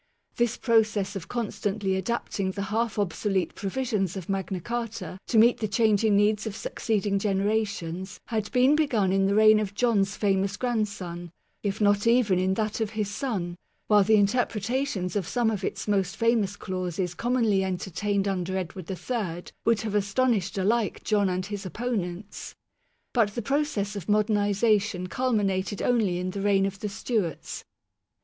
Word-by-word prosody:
This 240 -1 +1
process 215 -4 +2
of 175 -4 -6
constantly 205 -4 -2
adapting 195 -1 -2
the 195 +1 -3
half 230 -1 0
obsolete 195 0 0
provisions 200 -3 -2
of 185 -1 -7
Magna 190 -1 -2
Carta 225 -4 -4
to 230 - +1
meet 235 +2 +6
the 215 - -1
changing 215 0 +3
needs 210 +1 +2
of 205 - -5
succeeding 205 -3 -1
generations 195 -3 -1
had 220 -2 -3
been 255 +3 +4
begun 230 -11 +2
in 195 0 +3
the 200 - +1
reign 215 0 +7
of 205 -1 -3
John's 205 -5 +2
famous 195 0 0
grand 235 -4 0
son, 175 -4 -7 0.3
if 200 0 -2
not 205 +1 +3
even 230 -6 +4
in 190 +1 +1
that 215 +1 -2
of 220 - 0
his 205 -2 -1
son; 195 -8 -3 0.3
while 210 -1 +5
the 220 +3 +4
interpreta 230 +4 +1
tions 180 -7 -3
of 195 -5 -1
some 240 -2 +1
of 205 -3 -3
its - - -3
most 195 -2 0
famous 230 -4 +2
clauses 180 -2 -3
commonly 230 -4 +1
entertained 195 +2 -1
under 190 -1 -1
Edward 185 -1 -5
III 190 -3 -4
would 230 -2 +3
have 220 -2 -3
astonished 205 -1 +1
alike 210 +3 0
John 205 -3 +2
and 185 0 -2
his 205 -1 -5
opponents. 200 -2 -4 0.6
But 215 -4 +2
the 235 - -3
process 250 -7 -1
of 200 -3 -6
modernization 205 -2 +2
culminated 205 -6 0
only 220 -8 +2
in 180 +1 -2
the 200 - -4
reigns 195 -1 +2
of 195 - -16
the 210 - -3
Stewarts. 200 - -3
205 Hz, 160 wpm, -26 LUFS, 190-225 Hz, 0.6 s, reign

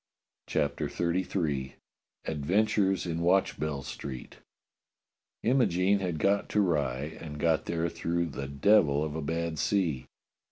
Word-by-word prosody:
CHAPTER 70 -1 -1
XXXIII 85 -6 -1 0.5
ADVENTURES 95 +6 +1
IN 85 -1 -2
WATCHBELL 75 -5 +1
STREET 65 -1 -7 1.1
IMOGENE 100 -6 +3
had 90 -4 -2
got 100 +6 +1
to 105 - +1
Rye, 75 -5 0
and 75 -2 -7
got 80 +1 +1
there 85 0 -1
through 85 0 -1
the 70 -1 -5
devil 75 0 +3
of 75 -1 -3
a 80 - -2
bad 80 +1 -2
sea. 85 -10 0
85 Hz, 120 wpm, -29 LUFS, 75-95 Hz, 1.1 s, IMOGENE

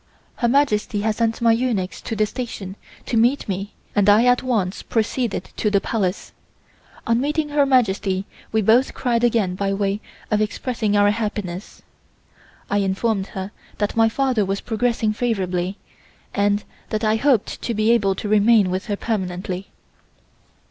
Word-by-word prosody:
Her 240 - +1
Majesty 230 -6 +2
had 220 +1 +1
sent 230 0 0
my 230 - +6
eunuchs 225 -6 -1
to 225 - -4
the 215 0 +2
station 210 -5 -6 0.3
to - - -2
meet 245 +5 +2
me 195 +1 -4 0.2
and 205 0 +4
I 215 +4 +6
at 245 0 +4
once 215 -7 -1
proceeded 225 -3 -2
to 210 - +1
the 200 -1 +3
Palace. 195 -2 -2 0.7
On 230 +1 +2
meeting 300 +2 -1
Her 290 -1 +2
Majesty 200 -7 +2 0.3
we 220 -1 +1
both 235 +6 +3
cried 240 -2 0
again 225 -6 +2
by 195 +1 -1
way 200 +1 -1 0.3
of 215 0 +2
expressing 215 -1 -1
our 205 0 +5
happiness. 205 -4 -4 0.8
I 205 - +1
informed 195 +1 0
her 190 +1 -4 0.3
that 205 0 -1
my 225 0 +4
father 255 -2 +1
was 195 +1 -1
progressing 230 -2 0
favorably 190 -5 -1 0.6
and 205 0 +1 0.3
that 215 +1 -2
I 215 0 +3
hoped 250 -3 +1
to 235 - -2
be 215 +2 +3
able 200 -5 +2
to 210 - -5
remain 210 -2 +4
with 185 +4 -3
her 205 - -1
permanently. 185 -3 -3
215 Hz, 160 wpm, -22 LUFS, 195-235 Hz, 0.8 s, my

